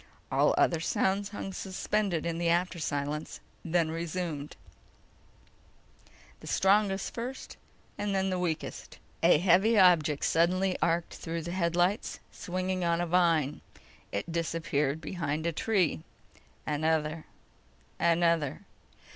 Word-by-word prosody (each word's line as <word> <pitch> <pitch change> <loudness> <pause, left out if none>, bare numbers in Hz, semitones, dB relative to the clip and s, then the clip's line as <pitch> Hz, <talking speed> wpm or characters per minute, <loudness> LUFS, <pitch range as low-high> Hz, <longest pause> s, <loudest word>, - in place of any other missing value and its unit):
All - - +3
other 170 - +3
sounds 195 +4 0
hung 195 -2 -6
suspended 190 -2 -1
in 170 0 -2
after 175 +1 +1
silence, 145 0 -3 0.2
then 165 -1 +1
resumed: 165 -3 -4 1.8
the - - -12
strongest 195 0 +2
first 250 +3 -6 0.4
and 205 -1 -1
then 190 0 +1
the 185 - -1
weakest. 165 -3 -4 0.2
A 165 -1 +6
heavy 190 +7 +4
object 165 -6 +4
suddenly 180 +3 +2
arced 170 0 0
through 165 0 -4
the 170 - -5
headlights, 175 +3 0
swinging 185 0 -3
on 170 0 +1
a 175 - 0
vine. 165 -4 +2 0.5
It 100 +11 -3
disappeared 160 -3 -1
behind 155 -2 -3
a 170 - +1
tree. 180 - +1 0.6
Another. 155 +1 -1 0.7
Another. 170 -4 +2
170 Hz, 115 wpm, -29 LUFS, 160-185 Hz, 1.8 s, A